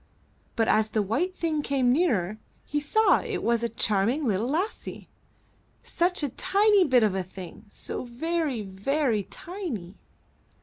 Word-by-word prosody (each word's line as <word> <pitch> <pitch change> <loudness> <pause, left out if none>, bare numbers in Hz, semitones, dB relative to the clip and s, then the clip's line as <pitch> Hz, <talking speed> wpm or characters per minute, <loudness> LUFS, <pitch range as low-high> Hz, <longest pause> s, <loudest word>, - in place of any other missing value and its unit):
But 225 -2 +2
as 215 0 +3
the 215 0 +1
white 325 - -1
thing 320 -4 -1
came 265 -4 +2
nearer, 215 - +1 0.3
he 295 - -1
saw 430 +10 +3
it - - -4
was 235 0 +2
a 235 - -1
charming 230 +5 +1
little 215 0 0
lassie, 360 +9 -3 0.7
such 350 -1 0
a 290 - 0
tiny 395 - +3
bit 255 -4 +4
of 210 -3 +2
a 190 - -1
thing, 185 +3 -10
so - - -5
very, 275 0 -2
very 215 +5 0
tiny. 240 - -7
250 Hz, 145 wpm, -27 LUFS, 215-330 Hz, 0.7 s, bit